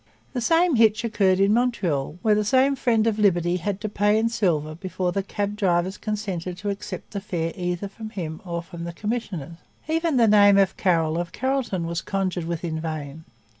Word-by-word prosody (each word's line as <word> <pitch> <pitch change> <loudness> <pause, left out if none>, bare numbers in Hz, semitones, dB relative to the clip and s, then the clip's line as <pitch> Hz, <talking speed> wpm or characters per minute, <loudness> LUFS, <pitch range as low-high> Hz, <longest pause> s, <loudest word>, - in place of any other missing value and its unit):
The 250 - -2
same 330 +2 +3
hitch 220 0 +4
occurred 195 -5 +2
in 200 +1 +4
Montreal, 180 - 0
where 215 - +4
the 210 0 +2
same 260 +6 +3
Friend 230 -4 +2
of 220 -2 0
Liberty 175 -3 +2
had 195 +2 -3
to 215 - -2
pay 205 +1 +2
in 225 +1 +2
silver 160 -9 0
before 180 +1 -3
the 195 - -1
cab 205 +1 -3
drivers 185 -2 0
consented 190 -5 -4
to 205 +2 -2
accept 200 - -7
a 200 - -2
fare 170 -5 -3
either 180 +1 -3
from 215 +2 -9
him 165 -7 -6
or 170 -2 -4
from 170 -1 -9
the 170 - -5
commissioners. 180 - -4 0.3
Even 325 -2 +1
the 230 -2 +5
name 205 -1 +6
of 195 -1 +3
Carroll 165 -3 +1
of 175 -1 -4
Carrollton 255 -9 -1
was 170 0 -2
conjured 185 -3 -2
with 170 0 -4
in 160 -2 -2
vain. 155 -1 -5
195 Hz, 200 wpm, -24 LUFS, 170-215 Hz, 0.3 s, name